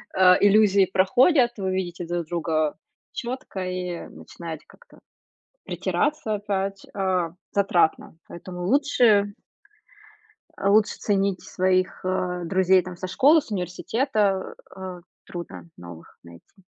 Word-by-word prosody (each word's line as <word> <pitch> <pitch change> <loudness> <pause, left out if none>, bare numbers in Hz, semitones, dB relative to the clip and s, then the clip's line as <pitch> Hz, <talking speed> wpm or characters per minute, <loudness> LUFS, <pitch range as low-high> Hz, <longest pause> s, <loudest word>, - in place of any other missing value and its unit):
а, 185 -1 +6
иллюзии 200 -1 +5
проходят, 240 - +4
вы 190 -2 -2
видите 175 -2 -3
друг 175 0 -2
друга 155 -2 -1 0.4
чётко 245 -5 -6
и 180 -1 -4
начинаете 160 -3 -9
как-то 485 - -20 0.7
притираться. 290 -7 -1
Опять, 195 -1 -3
а, 185 -4 -1 0.2
затратно, 180 -5 +1
поэтому 180 +1 -8
лучше 235 -6 +3 1.3
А 200 - +1
лучше 210 +1 +3
ценить 195 -2 0
своих, 185 0 0
э, 185 -1 -2
друзей 185 +1 +3
там 180 0 -9
со 185 - -5
школы, 280 - +4
с 275 - -15
университета, 200 - -1
э, - - -18
а, 185 -2 -7 0.2
трудно 170 -1 -9
новых 85 -1 -13
найти. 85 - -17
190 Hz, 120 wpm, -24 LUFS, 180-205 Hz, 1.3 s, а